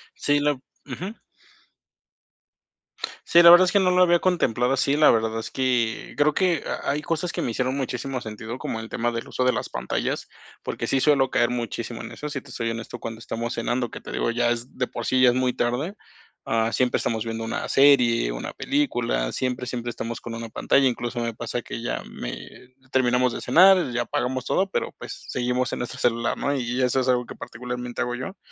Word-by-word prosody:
Sí, 145 0 +1
la 145 0 +2
ujú. 145 - -9 2.1
Sí, 170 - +7
la 170 - +10
verdad 175 +2 +9
es 180 - 0
que 200 - +4
no 185 -1 +3
lo 180 0 +5
había 175 -1 +4
contemplado 130 -9 +1
así, 135 +1 +2
la 155 - +6
verdad 110 0 +2
es 115 - -6
que, 125 -4 -1
creo 150 0 +2
que 180 -5 +2
ha - - -2
hay 150 - -1
cosas 165 +3 -2
que - - -3
me - - -1
hicieron 130 +3 -1
muchísimo 130 -1 -3
sentido, 110 +2 -7
como 110 - -3
el 110 - -7
tema 120 +1 -1
del 115 0 -5
uso 130 - -1
de 125 - +4
las - - -3
pantallas, - - -3 0.3
porque - - -4
sí 135 - +1
suelo 135 -2 +3
caer 120 - +3
muchísimo 120 -1 -4
en - - -8
eso. 150 - -6
Si 145 - -3
te - - -15
soy 115 -1 -2
honesto, 115 0 -6
cuando 115 -1 -6
estamos 115 +1 -4
cenando, 120 +1 -1
que - - -8
te - - -10
digo, - - 0
ya 120 0 +1
es 120 +1 -5
de 125 - +1
por 120 -1 -6
sí 130 0 +3
ya 125 - +7
es 120 - +1
muy 130 -1 +1
tarde. 125 +11 -1 0.5
Ah, 115 0 +1
siempre 125 0 +2
estamos 110 -1 -2
viendo 115 0 -4
una 115 - -3
serie, 125 - +4
una - - -5
película, 120 - 0
siempre, 125 -1 -2
siempre 120 -1 -4
estamos 115 0 -5
con 115 -1 -6
una 115 0 -6
pantalla, 135 +4 +3
incluso 120 -1 -2
me 115 -1 -2
pasa 120 +1 -4
que - - -6
ya 120 - -3
me 125 - -9 0.2
terminamos 125 -1 +2
de - - -5
cenar, 190 +2 +7
y - - -7
ya 120 0 0
apagamos 125 +1 -2
todo, 195 +1 +1
pero - - -2
pues, - - -9
seguimos 125 0 -1
en - - -3
nuestro 125 +1 -5
celular, 115 -1 +1
¿no?, 140 - 0
y 125 0 -1
eso 125 +1 +2
es 130 - -1
algo 125 -1 +2
que - - -9
particularmente 125 +1 -6
hago 120 - -3
yo. 130 +11 -6
125 Hz, 215 wpm, -24 LUFS, 115-140 Hz, 2.1 s, la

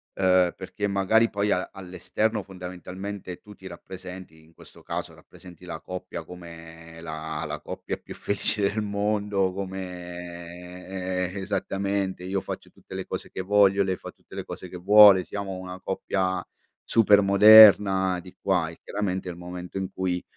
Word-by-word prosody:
ehm, 90 -2 +3
perché 100 +2 -4
magari 100 +4 +3
poi 100 0 -1
a 90 - 0
all'esterno, 100 +3 -2
fondamentalmente, 90 +1 -7
tu 105 - -13
ti 95 -2 -12
rappresenti, 95 -3 -10
in 80 +1 -23
questo - - -16
caso - - -5
rappresenti 90 -1 -15
la 85 -2 -6
coppia 90 -2 -7
come 80 -1 -11
la 80 -1 -5
la 75 0 -5
coppia - - -5
più - - -11
felice 105 +1 -1
del 100 +2 +1
mondo, 100 -2 0
come, 90 0 -6
eh, 100 - -6
esattamente, 95 -1 -2
io 95 +1 -2
faccio 95 - -7
tutte - - -13
le - - -4
cose - - -6
che - - -5
voglio, 100 0 +4
lei 95 -1 -1
fa - - -9
tutte - - -18
le - - -4
cose 95 - -8
che 90 - -9
vuole, 100 0 +8
siamo 100 -1 -5
una 90 0 -8
coppia 95 -1 -2 0.5
super 105 -3 +6
moderna 100 -2 +8
di 90 0 -13
qua 90 -4 +1
e, 85 - -13
chiaramente, 95 -3 -3
il 90 - -5
momento 90 +1 -8
in 95 -1 -3
cui, 90 -2 -2
95 Hz, 160 wpm, -26 LUFS, 90-100 Hz, 0.5 s, vuole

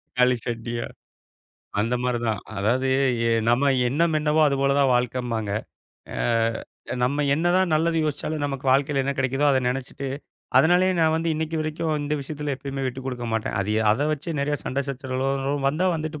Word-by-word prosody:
தக்காளி 125 0 +4
சட்னியா, 115 0 -3 0.9
அந்த 115 +4 +1
மாரிதான். 120 -4 0 0.2
அதாவது 125 +6 +1 0.4
எ - - +2 0.2
நம்ம 135 +4 +3 0.2
எண்ணம் 160 +5 +1
என்னவோ 150 +1 +1
அதுபோலதான் 140 -1 +2
வாழ்க்கன்பாங்க. 120 -3 -1 0.6
அ - - -5 0.9
நம்ம 145 +4 +1
என்னதான் 175 +2 +2
நல்லது 165 +2 +2
யோசிச்சாலும் 150 0 -2
நமக்கு 135 -1 -5
வாழ்க்கையில் 140 +1 +2
என்ன 140 - -1
கிடைக்குதோ 135 +2 +1
அத 135 - +4
நெனைச்சுட்டு, 135 +2 -3 0.5
அதனாலயே 180 +3 +4
நான் 160 -1 +3
வந்து 165 +1 -1
இன்னைக்கு 160 +1 -2
வரைக்கும் 155 0 -2
இந்த 145 +1 -1
விஷயத்தில 145 +1 -4
எப்பயுமே 135 0 -5
விட்டுக்குடுக்க 125 -1 -4
மாட்டேன். 110 0 -1
அது 105 +2 -1 0.2
அத 140 +7 0
வச்சு 155 +3 -4
நெறைய 145 +1 0
சண்டை 140 +2 -1
சச்சரவுகளோ 135 +1 -2
வந்தா 160 +7 0
வந்துட்டு 155 -1 -5
140 Hz, 150 wpm, -24 LUFS, 125-155 Hz, 0.9 s, தக்காளி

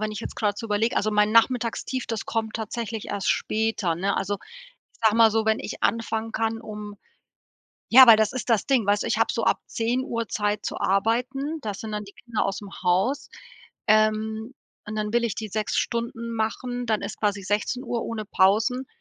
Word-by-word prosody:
wenn 215 0 -2
ich 210 - -5
jetzt - - -7
grad 205 -2 0
so 225 - -5
überleg 215 +3 +1
also 215 - +1
mein 210 0 +2
Nachmittagstief, 240 +2 +1
das 225 -1 -3
kommt 220 -1 -2
tatsächlich 225 0 -4
erst 200 -2 -2
später, 215 -6 0
ne? 195 +3 0
Also, 200 +1 -1
ich - - -19
sage 220 -1 +4
mal 225 -2 +6
so: 225 0 +1
Wenn 220 0 +2
ich - - -7
anfangen 225 -1 0
kann, 225 0 -1
um 210 -2 -8 0.9
ja, 260 +2 +9
weil 230 -3 +9
das 220 +1 +1
ist 255 -1 -4
das 225 -3 +2
Ding, 260 -6 +2
weißt 205 +1 +2
du, - - -3
ich - - 0
hab - - +2
so - - -2
ab - - +2
10:00 230 0 -1
Zeit 210 0 -1
zu - - -3
arbeiten, 250 +10 0
da 210 -2 -3
sind 215 +2 -7
dann 210 - -3
die 200 0 -13
Kinder 235 -3 -1
ausm 195 +1 -4
Haus, 190 +11 +1 0.6
ähm, 215 +2 +2 0.3
und 210 - -5
dann 210 0 -2
will 240 0 +3
ich 230 -3 -1
die 220 - -4
6 215 +1 -2
Stunden 235 0 -2
machen, 245 +2 -2
dann 220 -2 0
ist - - -5
quasi 205 -2 0
16:00 230 +5 -1
ohne 220 -2 -4
Pausen. 220 +7 +2
220 Hz, 200 wpm, -25 LUFS, 210-235 Hz, 0.9 s, ja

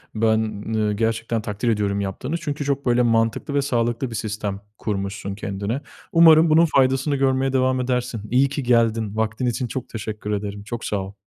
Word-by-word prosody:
Ben, 110 -1 +1
eee, 105 -1 +1
gerçekten 115 +1 -1
takdir 105 +3 -2
ediyorum 100 -2 0
yaptığını, 125 - -3
çünkü 145 -3 -4
çok 140 0 -1
böyle 120 0 +3
mantıklı 115 +3 +1
ve 140 - +2
sağlıklı 120 -1 -1
bir 115 - -6
sistem 105 -2 -3 0.2
kurmuşsun 100 -1 -3
kendine. 100 +6 -3 0.3
Umarım 165 -1 +7
bunun 160 +2 +6
faydasını 135 +2 +3
görmeye 135 0 +1
devam 130 0 +2
edersin. 125 -3 -2
İyi 135 +2 +4
ki 145 0 -3
geldin. 115 -3 +2
Vaktin 110 +3 -1
için 125 +1 -1
çok 130 +1 -5
teşekkür 105 -1 -5
ederim, 100 0 -3
çok 115 +2 -6
sağ 105 - -1
ol. 95 +1 -7
115 Hz, 175 wpm, -22 LUFS, 105-130 Hz, 0.3 s, Umarım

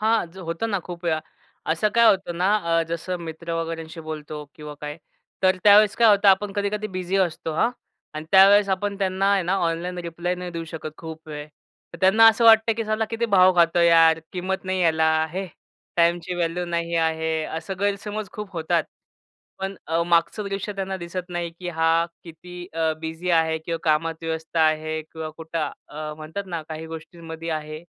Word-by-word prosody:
हां, 215 -5 +1
जर 190 - -12
होतं 170 +7 -2
ना, 200 - +1
खूप 175 -1 -8
वेळा. 160 -2 +1 0.5
असं 165 +6 +2
काय 235 0 +6
होतं 190 -3 +1
ना, 185 +4 +2 0.3
अ, - - +2
जसं 170 +2 -3
मित्र 170 +1 -6
वगैरेंशी 165 0 -6
बोलतो 155 -1 -7
किंवा 150 -1 -9
काय, 150 +1 -5 0.5
तर 185 0 +4
त्यावेळेस 210 0 +7
काय 230 -1 +5
होतं, 200 -1 +4
आपण 195 +1 +3
कधी-कधी 205 +1 -2
बिझी 185 +1 -1
असतो 170 -3 0
हां. 230 +9 +2 0.4
अन 155 0 -5
त्यावेळेस 200 +1 +7
आपण 200 +1 -4
त्यांना 195 0 +1
आहे 195 -2 +2
ना, 180 +2 0
ऑनलाइन 175 +2 -3
रिप्लाय 175 +2 -2
नाही 180 0 -6
देऊ 165 -1 -5
शकत 155 -1 -5
खूप 160 -1 -9
वेळ, 150 -1 -6 0.5
तर 170 - -10
त्यांना 215 +4 +6
असं 225 +1 +2
वाटतं 225 0 +7
की 225 - -2
साला 215 +1 0
किती 230 +1 -1
भाव 185 -1 +6
खातो 170 0 +4
यार, 165 -1 +6
किंमत 190 +1 -3
नाही 185 0 -1
यायल 160 -2 +2 0.3
हे 190 +2 -3 0.5
टाईमची 170 +1 +2
व्हॅल्यू 175 0 -1
नाही 170 -1 -2
आहे, 160 -1 0
असं 160 +5 -5
गैरसमज 205 +1 -2
खूप 210 -2 -7
होतात. 165 -1 0 0.8
पण 195 +1 -3
अ, 165 +1 +1
मागचं 170 +5 +2
दृश्य 195 +1 -3
त्यांना 195 -1 -3
दिसत 180 0 -6
नाही, 175 -1 -3
की 180 - -6
हा 165 0 +2 0.2
किती 170 +1 -12 0.2
अ, 160 -1 +1
बिझी 160 +3 -4
आहे 160 -1 +3
किंवा 165 +1 -4
कामात 160 +1 +1
व्यस्त 160 0 -4
आहे 155 0 +2
किंवा 160 0 -7
कुठं 160 -1 -3 0.2
अ, 150 0 -6
म्हणतात 160 +6 -6
ना, 170 -3 -4
काही 160 0 -6
गोष्टींमध्ये 165 0 -8
आहे. 155 0 -4
170 Hz, 185 wpm, -24 LUFS, 160-190 Hz, 0.8 s, त्यावेळेस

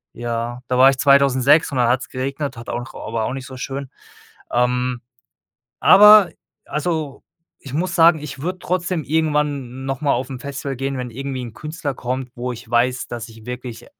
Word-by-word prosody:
äh, - - -14
ja 120 +1 -3
da 125 - +1
war 130 +1 +8
ich 135 - 0
2006 140 +1 +4
und - - -2
dann 120 -1 +3
hat's 130 +2 0
geregnet, 135 +1 -4
hat 115 0 -9
auch 120 +2 -5
aber 110 0 -3
auch 125 - -3
nicht 135 -1 -6
so 130 -1 -9
schön. 135 +1 -5 0.6
Ähm. 125 0 0 0.8
Aber, 210 -2 +9 0.3
also, 150 -2 -3 0.3
ich 135 - -11
muss 175 +2 -1
sagen, 165 -2 +6
ich 140 -3 -8
würde 180 +4 -4
trotzdem 180 -2 -1
irgendwann 145 -5 -1
noch 135 -1 -3
mal 145 -2 +2
aufm 130 +1 -3
Festival 140 0 -5
gehen, 135 +1 -3
wenn 125 -1 -5
irgendwie 135 +1 -5
'n 115 -3 -8
Künstler 155 0 -5
kommt, 130 +1 -4
wo 125 +1 -3
ich 120 0 -11
weiß, 125 +2 +1
dass 120 -1 -6
ich 110 0 -15
wirklich, 125 -1 -7
130 Hz, 185 wpm, -20 LUFS, 125-150 Hz, 0.8 s, Aber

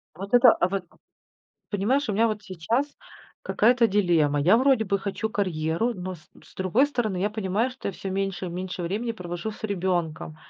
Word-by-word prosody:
Вот 195 +5 -8
это, 245 -1 +8
а 175 - 0
вот 195 -2 -3 0.9
понимаешь, 220 +7 +1
у - - +1
меня 225 +3 +3
вот 210 -1 -2
сейчас 220 - -1 0.6
какая-то 240 +1 +3
дилемма. 170 -8 +2
Я 185 +9 +5
вроде 260 -3 +3
бы 200 0 0
хочу 205 +3 -3
карьеру, 185 +3 -1
но 185 0 -5
с 155 - -22
с - - -19
другой 200 +9 +2
стороны, 225 -9 -2
я 205 +3 0
понимаю, 210 +3 -1
что 255 -5 -6
я - - -3
всё 190 +1 -6
меньше 195 -1 -2
и - - -3
меньше 180 +1 -5
времени 215 +7 -2
провожу 180 +1 -5
с - - -15
ребенком. 175 -6 -2
195 Hz, 190 wpm, -25 LUFS, 180-225 Hz, 0.9 s, это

